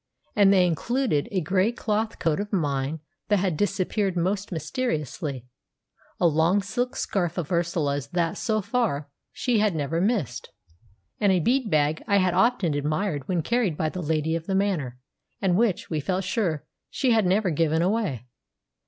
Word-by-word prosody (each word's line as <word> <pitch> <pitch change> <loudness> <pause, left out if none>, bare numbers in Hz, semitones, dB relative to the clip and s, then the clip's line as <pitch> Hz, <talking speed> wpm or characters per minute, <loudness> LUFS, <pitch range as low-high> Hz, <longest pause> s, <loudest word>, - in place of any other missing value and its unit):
And 200 -2 +6
they 185 -2 +5
included: 180 - 0
a 190 -3 0
grey 185 +6 +2
cloth 220 -2 -2
coat 165 -2 0
of 205 0 -4
mine 145 -4 -1 0.3
that 205 - +3
had 185 -3 0
disappeared 195 +1 0
most 190 +4 -1
mysteriously; 155 - -3 0.7
a - - +2
long 170 +5 +3
silk 245 +6 -2
scarf 175 -3 -1
of 170 -2 -3
Ursula's 160 -5 0
that, 170 +2 -1
so 215 -2 0
far, 195 - -1 0.2
she 245 -4 0
had 210 -4 +2
never 155 +2 -1
missed; 180 - -1 0.7
and 200 -2 +3
a 185 - +3
bead 245 - +1
bag 155 -1 +2
I 200 -2 +4
had 185 -2 +2
often 190 -4 +2
admired 150 +1 -1
when 175 -3 0
carried 230 -8 0
by 155 - 0
the 185 - -5
lady 160 0 0
of 165 0 -5
the 195 - 0
manor, 175 -11 0 0.4
and 185 -3 +2
which, 210 -4 +1
we 155 - 0
felt 185 +6 -1
sure, 180 -6 -1 0.2
she 260 -3 +1
had 220 -4 +3
never 190 0 +2
given 160 +1 +1
away. 185 - -1
180 Hz, 170 wpm, -25 LUFS, 155-205 Hz, 0.7 s, And